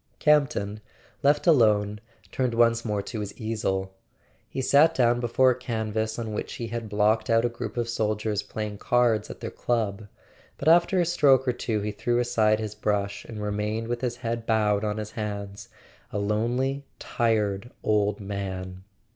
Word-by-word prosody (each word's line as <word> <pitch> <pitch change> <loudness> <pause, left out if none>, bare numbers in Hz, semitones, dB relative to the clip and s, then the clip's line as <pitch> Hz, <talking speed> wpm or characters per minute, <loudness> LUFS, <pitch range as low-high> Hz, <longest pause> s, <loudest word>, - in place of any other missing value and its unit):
Campton, 130 -9 +2 0.4
left 145 +1 +3
alone, 105 - +4 0.3
turned 125 -3 -1
once 115 0 +3
more 105 -3 -2
to 110 - -5
his 100 -1 -6
easel. 95 -4 -2 0.6
He - - -5
sat 145 +5 +4
down 120 -1 +3
before 125 +2 +3
a - - -1
canvas 110 -3 -2
on 110 -2 -4
which - - -4
he 115 -2 -5
had 115 -2 -5
blocked 105 +2 +2
out 115 +1 +4
a - - +2
group 120 +1 -6
of 120 -1 0
soldiers 105 -2 -1
playing 105 -2 -5
cards 120 -4 +2
at - - -9
their - - -4
club; 110 -4 -2 0.5
but 140 - -4
after 170 +3 +5
a 175 - +3
stroke 140 -6 +4
or 125 - +2
two 110 -3 -2
he 105 +1 -2
threw 120 +3 -1
aside 110 -3 +2
his 110 -1 -4
brush, 100 -1 -2
and 105 -2 -7
remained 105 +2 -2
with 120 0 -3
his 125 -2 -1
head 115 -2 -4
bowed 105 -2 +2
on 105 0 -1
his 105 0 -5
hands, 100 -2 -5 0.4
a - - -3
lonely 120 +7 0
tired 110 -2 0
old 105 -1 +1
man. 95 -2 -5
110 Hz, 170 wpm, -26 LUFS, 105-120 Hz, 0.6 s, after